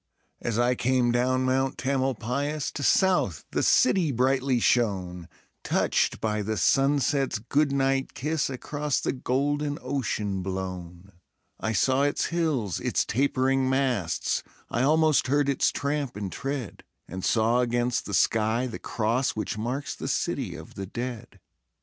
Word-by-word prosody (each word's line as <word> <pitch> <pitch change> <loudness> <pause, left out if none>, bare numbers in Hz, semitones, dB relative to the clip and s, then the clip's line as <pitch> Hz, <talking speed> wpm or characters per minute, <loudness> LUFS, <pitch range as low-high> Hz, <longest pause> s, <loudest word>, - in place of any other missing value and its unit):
As 115 -2 -2
I 120 +1 +3
came 125 0 +1
down 130 +2 +1
Mount 130 +1 +1
Tamalpais, 135 +2 -1
To 145 - -5
south 180 - +2
the - - 0
city 160 +3 +3
brightly 130 0 +1
shone, 95 -8 0 0.3
Touched - - +1
by 105 -1 -1
the 110 +1 -2
sunset's 135 - +2
good 140 +7 +1
night 135 -1 0
kiss 155 +2 -1
Across 145 +2 -2
the - - 0
golden 145 +3 -1
ocean 110 -7 -2
blown; 90 -1 -6 0.5
I 110 - -1
saw 130 +7 +2
its 145 0 +1
hills, 150 - 0
its - - 0
tapering 130 +1 +1
masts, 130 -10 0 0.3
I 120 - 0
almost 155 +1 +3
heard 145 +1 +2
its 140 - +2
tramp 140 -2 -2
and 100 -2 -4
tread, 135 -4 -5 0.2
And 95 +2 -7
saw 115 +2 +2
against 120 0 0
the - - -1
sky 110 +2 +2
the 120 - -6
cross 120 +4 -1
Which 110 +1 -3
marks 125 +6 -3
the - - -6
City - - -2
of - - -11
the 95 -1 -6
Dead. 120 -1 -6
130 Hz, 145 wpm, -26 LUFS, 110-140 Hz, 0.5 s, I